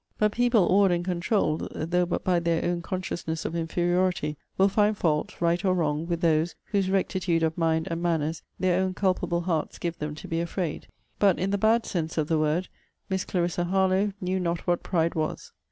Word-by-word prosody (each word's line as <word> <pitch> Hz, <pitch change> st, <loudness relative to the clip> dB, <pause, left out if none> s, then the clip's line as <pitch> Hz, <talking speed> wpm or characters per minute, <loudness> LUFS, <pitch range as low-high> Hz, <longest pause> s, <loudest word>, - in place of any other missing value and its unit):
But 210 Hz, -1 st, +2 dB
people 240 Hz, -4 st, +3 dB
awed 195 Hz, +1 st, +5 dB
and 175 Hz, 0 st, 0 dB
controuled, 180 Hz, -2 st, 0 dB
though 175 Hz, +3 st, 0 dB
but 175 Hz, -, -2 dB
by 180 Hz, -2 st, +2 dB
their 170 Hz, -1 st, 0 dB
own 175 Hz, 0 st, 0 dB
consciousness 170 Hz, -3 st, -4 dB
of 165 Hz, -, -3 dB
inferiority, 175 Hz, -1 st, 0 dB, 0.2 s
will 195 Hz, -, +5 dB
find 210 Hz, +1 st, +2 dB
fault, 150 Hz, -5 st, 0 dB
right 170 Hz, +2 st, +1 dB
or 185 Hz, -2 st, +2 dB
wrong, 155 Hz, -1 st, 0 dB
with 170 Hz, -1 st, -2 dB
those, 165 Hz, 0 st, +2 dB, 0.2 s
whose 195 Hz, -2 st, +1 dB
rectitude 185 Hz, -3 st, +1 dB
of 160 Hz, 0 st, +1 dB
mind 160 Hz, -1 st, +1 dB
and 165 Hz, 0 st, -2 dB
manners 160 Hz, -2 st, 0 dB, 0.2 s
their 185 Hz, 0 st, +2 dB
own 185 Hz, -1 st, -1 dB
culpable 185 Hz, -3 st, 0 dB
hearts 170 Hz, -3 st, -2 dB
give 170 Hz, -1 st, -4 dB
them 150 Hz, 0 st, -4 dB
to -, -, -9 dB
be 165 Hz, 0 st, -1 dB
afraid. 170 Hz, -1 st, -3 dB, 0.3 s
But, 195 Hz, -3 st, +4 dB
in 190 Hz, +2 st, -1 dB
the 200 Hz, -, +1 dB
bad 225 Hz, +3 st, +3 dB
sense 165 Hz, -3 st, -3 dB
of 155 Hz, -1 st, 0 dB
the 160 Hz, -1 st, +2 dB
word, 155 Hz, +4 st, +1 dB, 0.4 s
Miss 190 Hz, -1 st, 0 dB
Clarissa 175 Hz, -1 st, -1 dB
Harlowe 190 Hz, +2 st, +2 dB
knew 185 Hz, +1 st, -1 dB
not 170 Hz, -1 st, -2 dB
what 175 Hz, -1 st, +1 dB
pride 165 Hz, -2 st, 0 dB
was. 155 Hz, -1 st, -3 dB
175 Hz, 200 wpm, -26 LUFS, 165-185 Hz, 0.4 s, awed